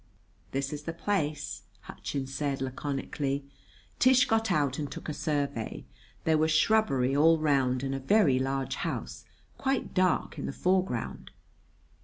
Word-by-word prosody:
"This 135 Hz, +1 st, -2 dB
is 150 Hz, -, -5 dB
the 165 Hz, -, -3 dB
place," 155 Hz, -5 st, -2 dB, 0.2 s
Hutchins 135 Hz, -1 st, -5 dB
said 140 Hz, -1 st, -1 dB
laconically. 135 Hz, +1 st, -3 dB, 0.5 s
Tish 255 Hz, 0 st, +6 dB
got 225 Hz, -2 st, +1 dB
out 145 Hz, -5 st, +1 dB
and 145 Hz, -2 st, -4 dB
took -, -, -7 dB
a 155 Hz, -, -2 dB
survey. 145 Hz, -7 st, -2 dB, 0.4 s
There 160 Hz, -1 st, +3 dB
was 160 Hz, +1 st, +3 dB
shrubbery 155 Hz, -8 st, +3 dB
all 160 Hz, +3 st, +5 dB
round 135 Hz, -4 st, +1 dB
and 135 Hz, 0 st, -1 dB
a 135 Hz, -, -2 dB
very 135 Hz, -3 st, +4 dB
large 135 Hz, 0 st, -1 dB
house, -, -, -4 dB, 0.3 s
quite 270 Hz, -1 st, -1 dB
dark, 185 Hz, -4 st, +1 dB
in -, -, -3 dB
the -, -, -4 dB
foreground. 185 Hz, -10 st, -1 dB
145 Hz, 145 wpm, -29 LUFS, 135-170 Hz, 0.5 s, Tish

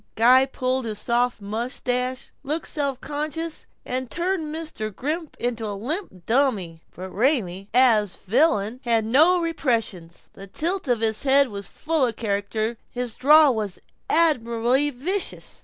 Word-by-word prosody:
Guy 255 Hz, +4 st, +5 dB
pulled 260 Hz, -1 st, -2 dB
his 215 Hz, -2 st, -4 dB
soft 240 Hz, +1 st, 0 dB
mustache, 250 Hz, +4 st, -2 dB
looked 305 Hz, +4 st, -3 dB
self 280 Hz, -4 st, -1 dB
conscious, 310 Hz, +2 st, -3 dB, 0.2 s
and 255 Hz, 0 st, -3 dB
turned 345 Hz, -2 st, -1 dB
Mr. 310 Hz, -9 st, -5 dB
Grimm 305 Hz, -, -3 dB
into 235 Hz, -2 st, -3 dB
a 205 Hz, -1 st, -4 dB
limp 240 Hz, -, -3 dB
dummy. 220 Hz, -11 st, +1 dB
But 185 Hz, +1 st, -8 dB
Raymie, 200 Hz, -, 0 dB
as 220 Hz, -5 st, +4 dB
the 190 Hz, -, -21 dB
villain, 245 Hz, -4 st, +2 dB
had 230 Hz, -3 st, +1 dB
no 315 Hz, +10 st, +4 dB
repressions. 230 Hz, -, -2 dB
The 195 Hz, -, -11 dB
tilt 340 Hz, -, -2 dB
of 240 Hz, -3 st, +1 dB
his 220 Hz, -1 st, 0 dB
head 275 Hz, 0 st, +4 dB
was 200 Hz, -2 st, -7 dB
full 320 Hz, -2 st, -1 dB
of 230 Hz, -, -4 dB
character; 215 Hz, +2 st, -2 dB
his 245 Hz, -2 st, -4 dB
drawl 300 Hz, 0 st, +6 dB
was 210 Hz, -4 st, -3 dB, 0.3 s
admirably 260 Hz, -3 st, +2 dB
vicious. 345 Hz, +10 st, -2 dB
250 Hz, 145 wpm, -23 LUFS, 220-295 Hz, 0.3 s, drawl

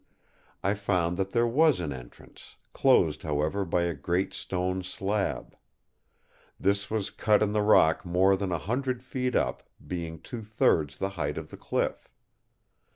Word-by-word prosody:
I 100 Hz, -, +2 dB
found 90 Hz, -4 st, 0 dB
that 95 Hz, 0 st, -1 dB
there 120 Hz, +3 st, +2 dB
was 145 Hz, -, +3 dB
an 80 Hz, -5 st, -3 dB
entrance, 60 Hz, -2 st, -13 dB, 0.2 s
closed 75 Hz, -1 st, +3 dB
however 75 Hz, +6 st, -1 dB
by 85 Hz, 0 st, +1 dB
a 85 Hz, -1 st, 0 dB
great 85 Hz, +6 st, -1 dB
stone 90 Hz, 0 st, -2 dB
slab. 95 Hz, +2 st, -3 dB, 1.0 s
This 100 Hz, +1 st, +1 dB
was 110 Hz, -2 st, -2 dB
cut 105 Hz, -1 st, +3 dB
in 105 Hz, -, 0 dB
the 105 Hz, 0 st, +1 dB
rock 90 Hz, -6 st, +4 dB
more 95 Hz, +2 st, +3 dB
than 95 Hz, -1 st, -3 dB
a 85 Hz, -, +1 dB
hundred 125 Hz, +5 st, -2 dB
feet 125 Hz, 0 st, -2 dB
up, -, -, 0 dB, 0.2 s
being 85 Hz, -3 st, -5 dB
two 120 Hz, +8 st, -7 dB
thirds 80 Hz, -9 st, +1 dB
the 95 Hz, -, -1 dB
height 75 Hz, -7 st, -3 dB
of -, -, -7 dB
the -, -, -8 dB
cliff. -, -, -2 dB
95 Hz, 160 wpm, -28 LUFS, 85-105 Hz, 1.0 s, rock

